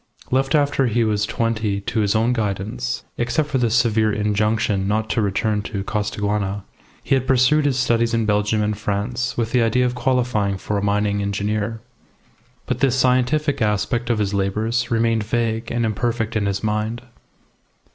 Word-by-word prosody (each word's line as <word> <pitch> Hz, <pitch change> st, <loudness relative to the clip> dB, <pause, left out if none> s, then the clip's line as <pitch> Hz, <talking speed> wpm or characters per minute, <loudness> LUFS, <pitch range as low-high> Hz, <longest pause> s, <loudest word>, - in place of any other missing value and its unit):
Left 135 Hz, +3 st, +2 dB
after 145 Hz, -3 st, +2 dB
he 120 Hz, +1 st, +1 dB
was 105 Hz, -1 st, 0 dB
twenty 110 Hz, -4 st, -1 dB
to 110 Hz, +3 st, -2 dB
his 105 Hz, 0 st, +1 dB
own 115 Hz, +3 st, +2 dB
guidance 110 Hz, +2 st, -3 dB, 0.2 s
(except 135 Hz, +5 st, 0 dB
for 135 Hz, -, 0 dB
the 120 Hz, -2 st, +2 dB
severe 110 Hz, -2 st, +2 dB
injunction 105 Hz, -1 st, 0 dB
not 110 Hz, +1 st, 0 dB
to 115 Hz, -, +1 dB
return 105 Hz, +1 st, 0 dB
to 100 Hz, -1 st, -4 dB
Costaguana), 105 Hz, -1 st, -2 dB, 0.4 s
he -, -, 0 dB
had 130 Hz, -1 st, +1 dB
pursued 135 Hz, +3 st, +4 dB
his 135 Hz, -3 st, +1 dB
studies 115 Hz, -3 st, +2 dB
in 115 Hz, -1 st, +1 dB
Belgium 105 Hz, +1 st, +1 dB
and 105 Hz, 0 st, 0 dB
France 105 Hz, +5 st, -2 dB
with 115 Hz, -1 st, -1 dB
the 125 Hz, -, +3 dB
idea 115 Hz, +2 st, +2 dB
of 125 Hz, -, 0 dB
qualifying 125 Hz, -6 st, 0 dB
for 105 Hz, -, -4 dB
a -, -, -4 dB
mining 100 Hz, 0 st, +1 dB
engineer. 105 Hz, +2 st, -2 dB, 0.8 s
But -, -, -2 dB
this 135 Hz, -2 st, +2 dB
scientific 130 Hz, +3 st, +1 dB
aspect 110 Hz, +3 st, 0 dB
of 120 Hz, -, +2 dB
his 105 Hz, -1 st, -1 dB
labours 110 Hz, +5 st, 0 dB
remained 115 Hz, -1 st, +1 dB
vague 115 Hz, +1 st, -1 dB
and 120 Hz, -1 st, 0 dB
imperfect 115 Hz, +1 st, -1 dB
in 105 Hz, -2 st, +1 dB
his 100 Hz, +1 st, -2 dB
mind. 110 Hz, +3 st, -2 dB
110 Hz, 170 wpm, -21 LUFS, 105-120 Hz, 0.8 s, pursued